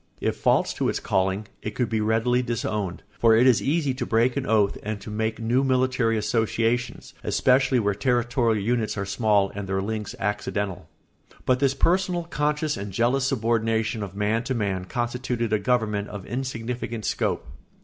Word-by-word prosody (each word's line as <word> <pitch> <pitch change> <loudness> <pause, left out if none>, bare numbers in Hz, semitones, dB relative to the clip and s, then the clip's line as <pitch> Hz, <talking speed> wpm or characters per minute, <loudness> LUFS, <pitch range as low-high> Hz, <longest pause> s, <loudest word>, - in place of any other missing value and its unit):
If - - -1
false - - +2
to - - 0
its - - -1
calling, 95 +2 0 0.2
it 105 - -5
could 125 - 0
be 110 0 -1
readily 115 +3 +2
disowned, 105 -6 -3 0.2
for 115 -1 +5
it 120 +3 +5
is 125 -4 +5
easy 145 -2 +1
to 130 0 -4
break 120 +1 +2
an 140 -1 -2
oath 105 -3 +3
and 105 0 -4
to 105 - -8
make 110 +1 -1
new 120 +4 +1
military 130 -3 +2
associations, 115 +2 -1
especially 130 0 +3
where 100 -2 +1
territorial 120 0 +1
units 110 +1 -1
are 100 - -2
small 100 -1 +2
and 100 -1 -6
their 95 0 0
links 105 +1 -4
accidental. 100 -1 -3 0.6
But 125 -1 +3
this 135 -1 +2
personal, 180 +2 +1
conscious, 150 -1 -1
and 100 0 -5
jealous 125 +6 +1
subordination 115 -3 0
of 100 -1 -6
man 105 +3 0
to 130 -1 -1
man 100 -5 -1
constituted 120 0 -2
a 110 - +3
government 105 -2 0
of 100 -2 -7
insignificant 120 -2 -4
scope. - - -1
115 Hz, 170 wpm, -25 LUFS, 105-125 Hz, 0.6 s, for